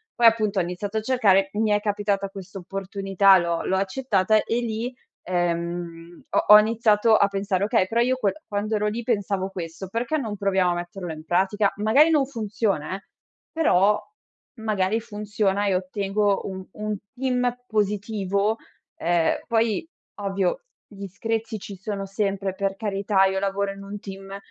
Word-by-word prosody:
Poi, 235 -1 +6
appunto, 215 -3 +3
ho - - +3
iniziato 185 +5 -4
a 220 - 0
cercare, 200 -6 +3
mi 215 0 +1
è 205 - +3
capitata 205 -1 0
questa 195 0 -9
opportunità, 195 +1 +3
l'ho 170 -1 -1
l'ho 190 - +1
accettata 210 0 +1
e 235 +1 -1
lì, 235 +2 -3 0.3
ehm, 170 -1 -3
ho - - +1
ho 210 - +12
iniziato 220 0 +3
a 200 - +4
pensare: 195 -1 -1
"Okay, 215 -4 +2
però 230 +3 +1
io 255 +1 +2
quel 205 -6 +1
quando 210 +1 -1
ero 210 0 0
lì 225 +3 -2
pensavo 200 -4 -1
questo, 175 0 -6
perché 235 +9 -1
non 220 -7 -4
proviamo 190 -2 +2
a - - -1
metterlo 175 0 -5
in 155 0 -9
pratica? 195 +4 +2
Magari 260 +10 +5
non 290 -3 +3
funziona 210 - -2
eh, 195 - -8 0.5
però, 210 - +3 0.6
magari 215 -1 0
funziona, 205 -2 -1
e 190 - +2
ottengo 195 +2 0
un 190 -1 -6
un 210 0 -3 0.2
team 250 -1 0
positivo." 205 0 0 0.4
Ehm, 170 -1 +2
poi 230 +4 +1 0.3
ovvio 195 - -1 0.2
gli 200 -1 -8
screzi 225 +3 -3
ci 195 0 -9
sono 195 +1 -4
sempre, 195 -1 -2
per 195 0 -1
carità, 200 -1 +1
io 190 0 +1
lavoro 200 0 -1
in 195 - -11
un 200 +1 -6
team 195 0 -8
200 Hz, 160 wpm, -24 LUFS, 190-220 Hz, 0.6 s, ho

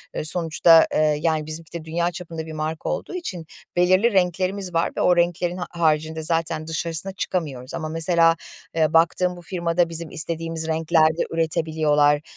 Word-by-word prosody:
ııı, - - -3
sonuçta, 165 0 +4
ııı, 155 -1 +3
yani, 155 -1 0
bizimki 155 +1 -8
de 160 - -13
dünya 170 +2 -1
çapında 165 -2 -7
bir 160 - -8
marka 155 +1 -4
olduğu - - -4
için 185 - -5 0.3
belirli 185 +5 +3
renklerimiz 185 +1 0
var 165 0 +1
ve - - 0
o 180 -1 +3
renklerin 175 +1 0
ha 180 - -4
haricinde 160 -1 0
zaten 165 -1 -1
dışarısına 165 +3 -2
çıkamıyoruz 145 -9 -4
ama 155 -1 -4
mesela, 165 0 +3 0.4
eee, 155 -2 +2
baktığım 180 +2 +2
bu - - -11
firmada 170 -1 0
bizim 165 -1 -2
istediğimiz 165 0 -2
renklerde 160 0 +2
üretebiliyorlar. 155 -3 +1
165 Hz, 160 wpm, -23 LUFS, 155-175 Hz, 0.4 s, sonuçta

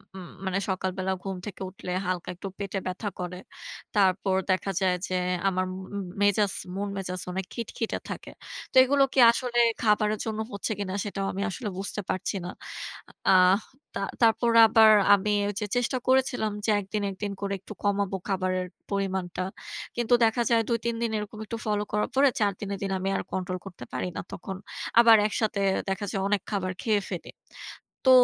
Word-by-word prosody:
উম 185 -2 -8 0.2
মানে 190 0 0
সকালবেলা 190 0 -1
ঘুম 195 -1 -3
থেকে 200 -2 -8
উঠলে 185 -1 -9 0.2
হালকা 180 -1 -2
একটু 190 - -7
পেটে 200 -1 -2
ব্যথা 195 +3 -3
করে। 180 0 -4 0.6
তারপর 190 -1 +3 0.2
দেখা 185 +1 0
যায় 185 -1 +3
যে - - -4 0.3
আমার 185 -1 +1 0.3
উম 200 - -2 0.2
মেজাজ, 205 0 +3 0.2
মন 200 +1 -2
মেজাজ 185 -2 -3
অনেক 190 +1 -3
খিটখিটে 230 -1 -3
থাকে। - - -6 0.4
তো - - -16
এগুলো 275 +2 +4
কি - - +2
আসলে 240 0 -1 0.2
খাবারের 210 -1 +2
জন্য 220 -1 -3
হচ্ছে 200 +2 -3
কিনা? 190 -2 -3
সেটাও 195 -1 -3
আমি 195 - -3
আসলে 210 +3 -4
বুঝতে 200 +2 -1
পারছি 185 +2 -1
না। - - -4 0.8
আহ 185 +1 +6 0.4
তা - - -2 0.2
তারপর 230 +1 +4 0.2
আবার 220 0 +7 0.2
আমি 200 +1 +2 0.2
ওইযে 205 +1 -3
চেষ্টা 245 +2 +1
করেছিলাম 255 -4 +2
যে - - 0
একদিন, 205 +2 -3
একদিন 200 +1 -4
করে 200 0 -1
একটু 215 - -10
কমাবো 200 -1 +1
খাবারের 185 -1 0 0.2
পরিমাণটা। 190 -3 -1 0.5
কিন্তু 240 0 +1
দেখা 225 +2 +1
যায় 230 -1 +4
২ 235 - +2
৩ 235 0 0
দিন 230 -1 0
এরকম 210 0 -6
একটু 230 +2 -5
ফলো 210 -1 +1
করার 210 +1 0
পরে 275 +1 +6
৪ 205 -2 +3
দিনের 200 -1 -3
দিন 195 - -2
আমি 190 +1 -1
আর - - -3
কন্ট্রোল 185 0 -2
করতে 180 -10 -9
পারি - - -2
না - - -2
তখন, 190 +2 -6 0.4
আবার 230 -1 +8
একসাথে 215 -1 -1 0.3
দেখা 195 +2 -2
যায় 195 - -1
অনেক 200 -1 +1
খাবার 190 -3 -1
খেয়ে 215 -3 +2
ফেলি। - - -5 0.8
তো - - +6
200 Hz, 175 wpm, -27 LUFS, 190-220 Hz, 0.8 s, আবার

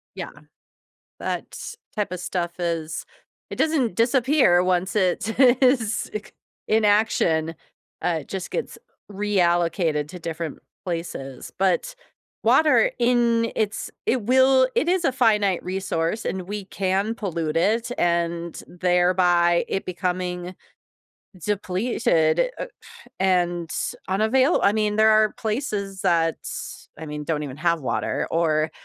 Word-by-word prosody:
Yeah, - - -5 0.9
that's - - -5 0.2
type 205 -4 -2
of 180 - -4
stuff 175 -2 -2
is 165 -2 -3 0.5
it - - -6
doesn't 280 - +1
disappear 250 - +4
once 185 0 0
it 205 +2 0
is 250 -3 +3
it 210 0 -5
c - - -19 0.4
in 220 0 +3
action, 205 -7 +2 0.5
uh, 170 -2 +1
it - - -14
just 190 -2 -5
gets 485 - -4 0.3
reallocated 175 -6 +1
to 180 +3 -9
different 165 -2 -5 0.3
places. 165 -7 -5
But 195 - +1 0.5
water 310 - +4
in 235 -1 +2
it's 215 -1 -2 0.2
it 250 -1 +1
will 260 +3 +4
it - - +1
is 360 -1 +1
a 270 - +2
finite 210 -7 +2
resource, 185 +1 -2
and 190 - -2
we 200 +2 -6
can 195 +3 -1
pollute 170 -8 -3
it, 225 +7 +1
and 170 0 -1
thereby 175 -1 +2
it 195 - -2
becoming 180 0 -3 0.9
depleted, 205 - +1
uh, - - -2 0.5
and 175 -3 +1
s - - -2
unavail 230 - +3
I 200 - +4
mean, 210 -1 0
there 220 0 +5
are 215 0 +4
places 210 -4 -3
that 165 -2 +2
s - - -7
I 160 - -7
mean, 150 0 -5
don't 150 -1 -1
even 135 -2 -7
have 170 0 +1
water 130 - -2
or 155 -2 +1
190 Hz, 130 wpm, -23 LUFS, 170-225 Hz, 0.9 s, there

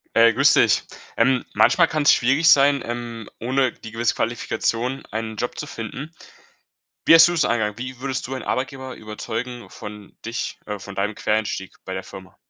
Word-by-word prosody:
Hey, 115 0 +7
grüß - - +4
dich. - - +4 0.3
Ähm, 130 -2 +3
manchmal 170 -2 +5
kann's 155 -2 +4
schwierig 140 +6 +2
sein, 140 -2 +5
ähm, 120 -2 -6
ohne 130 +1 +1
die 115 - -11
gewisse 115 +1 0
Qualifikation 120 +2 -2
einen 110 0 -5
Job 120 - -3
zu - - -4
finden. 140 +2 -7 1.0
Wie - - +8
hast 165 0 +9
du - - -1
das 165 -4 +2
angegangen? 110 -2 -1
Wie 130 +1 -6
würdest 135 -1 -3
du 130 - -5
ein 130 - -5
Arbeitgeber 130 0 -3
überzeugen 115 +3 -6
von 105 -1 -10
dich, 115 +1 -4
äh 105 -1 -4
von 100 0 -10
deinem 105 +2 -1
Quereinstieg 105 -3 -2
bei 95 - -4
der 95 - -4
Firma? 95 0 -12
120 Hz, 180 wpm, -22 LUFS, 110-135 Hz, 1.0 s, hast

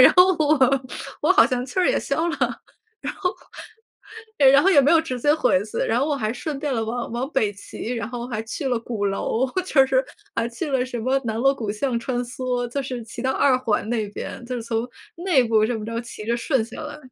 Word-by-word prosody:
然 255 - +10
后 360 +1 +8
我 305 -1 +3 0.6
我 - - +2
好 - - +7
像 250 -1 -1
气 260 - -5
儿 365 - +4
也 - - +2
消 330 +2 -1
了。 330 - -2
然 - - -3 1.7
后 - - +10
然 280 - +5
后 385 - +5
也 285 - +7
没 275 - +3
有 335 - +6
直 305 -6 -4
接 290 +5 +3
回 200 -11 +2
去， 215 - -7
然 230 - +1
后 280 - +1
我 295 - 0
还 220 -4 -2
顺 290 +3 -4
便 285 -1 -2
了 225 -2 0
往 235 +2 -4
往 245 +4 -3
北 215 -8 +1
骑， 215 +4 -6
然 230 -2 -4
后 240 -1 -5
还 220 -3 -3
去 260 +5 -4
了 245 -3 0
鼓 225 -3 -3
楼， 200 +5 0 0.2
就 275 -7 +4
是 265 0 +2 0.3
还 230 - 0
去 280 +6 -4
了 260 -2 +2
什 250 -2 -5
么 260 +4 +1
南 220 -2 -2
锣 270 +4 +4
鼓 220 -6 -3
巷 235 +3 -1
穿 245 +1 -3
梭， 245 0 -3
就 275 +4 -3
是 255 -3 -5
骑 230 +2 -8
到 260 +1 +1
2 265 0 +3
环 220 -4 0
那 225 -3 -1
边， 210 - -7
就 250 +1 -4
是 235 - -4
从 230 +1 -2 0.3
内 340 -7 +3
部 225 -2 +3
这 230 +1 0
么 215 - -6
着 230 +1 -3
骑 235 -3 -9
着 235 +1 +1
顺 240 -1 0
下 245 - -9
来。 300 -1 -7
245 Hz, 255 characters per minute, -23 LUFS, 230-275 Hz, 1.7 s, 然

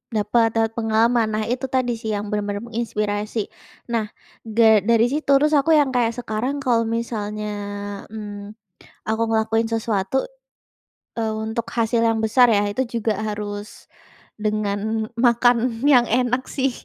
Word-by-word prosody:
dapat, 215 +2 +2
dapat 225 0 +2
pengalaman. 225 +1 +2
Nah, 215 0 0
itu 255 +1 -2
tadi 255 -2 +1
sih 220 - -4
yang 205 - -3
benar-benar 205 0 -2
menginspirasi. 215 -2 -2 0.5
Nah, 220 -2 +1 0.5
da 230 - +5 0.3
dari 230 0 +5
situ, 295 0 -3
terus 300 +2 +2
aku 280 - -1
yang 280 -2 +2
kayak 235 -1 +2
sekarang 245 +4 -2
kalau 235 -2 +2
misalnya, 215 -2 -4 0.7
mmm, 205 -1 -7 0.6
aku 220 +1 0
ngelakuin 225 0 +1
sesuatu, 220 -1 -1 1.0
eee, 220 -1 0
untuk 225 +1 -3
hasil 230 0 +2
yang 225 -1 +1
besar 245 +3 +5
ya, 205 - +3
itu 255 - -1 0.2
juga 220 0 0
harus 205 0 -4 0.8
dengan 215 +1 -1 0.2
makan 240 0 +4 0.3
yang 255 -4 +6
enak 250 +1 +1
sih 265 0 +2
225 Hz, 140 wpm, -22 LUFS, 215-240 Hz, 1.0 s, yang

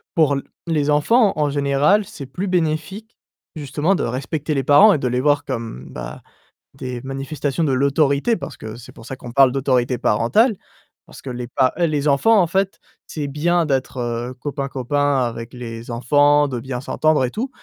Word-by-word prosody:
pour 150 -4 +3
l 140 - -2 0.3
les 150 -3 0
enfants 200 - +3
en 150 -1 +1
général, 145 +8 +2
c'est 140 - -9
plus 185 +9 -5
bénéfique, 180 +5 -2 0.4
justement, 150 +5 0
de 190 - -1
respecter 140 +5 -3
les 135 -2 0
parents 195 - +7
et 155 - +1
de 130 - -1
les 125 +1 0
voir 145 +1 +2
comme, 115 - -5
bah, - - -8 0.6
des 125 -1 -5
manifestations 135 +3 -3
de 150 - +1
l'autorité 140 - +2
parce - - -8
que 110 0 -8
c'est 125 +2 -12
pour 115 - -14
ça 130 - -6
qu'on 120 -2 -10
parle 130 +1 +5
d'autorité 130 -2 +1
parentale. 165 - +2 0.5
Parce - - -13
que 135 - -6
les 125 -1 -5
pa 130 +1 +1
heu, 170 - +3
les 150 -1 -1
enfants 200 +11 +4
en 175 - +1
fait, 195 +3 -1 0.3
c'est 150 -3 -4
bien 165 +4 +1
d'être, 135 -2 -2
heu, 120 +1 -3
copain-copain 140 +1 -1
avec 115 0 -5
les 115 -2 -8
enfants, 145 +5 +3
de 125 -3 -4
bien 125 0 -5
s'entendre 155 0 +1
et 125 - -4
tout, 245 - -3
140 Hz, 185 wpm, -20 LUFS, 125-155 Hz, 0.6 s, parents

